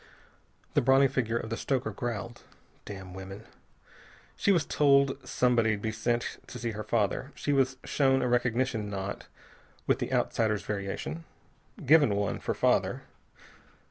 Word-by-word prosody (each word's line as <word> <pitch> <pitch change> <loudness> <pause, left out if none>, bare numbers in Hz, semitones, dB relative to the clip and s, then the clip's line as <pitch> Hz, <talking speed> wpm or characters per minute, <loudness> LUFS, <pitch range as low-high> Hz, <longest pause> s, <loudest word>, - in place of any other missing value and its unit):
The - - +4
brawny 135 +2 +5
figure 120 -4 -1
of 110 -1 -5
the 115 - -2
stoker 135 -1 -1
growled. 120 -1 -5 0.4
"Damn 95 -2 -8
women! 95 +3 -9 0.9
She 200 - +2
was 170 -6 +3
told 140 -2 +4
somebody'd 115 -4 +2
be 110 +1 -2
sent 120 +2 -2
to - - -8
see 120 -1 -3
her 105 0 -5
father. 110 +5 0
She 145 - -1
was 130 -1 +2
shown 135 -2 +2
a - - +1
recognition 120 -2 0
knot 100 0 -5 0.6
with - - +2
the - - -3
outsider's 110 -2 +1
variation. 100 +10 -4 0.6
Given 145 -7 +5
one, 100 -1 -1
for - - -2
father. - - +1
120 Hz, 140 wpm, -29 LUFS, 105-135 Hz, 0.9 s, brawny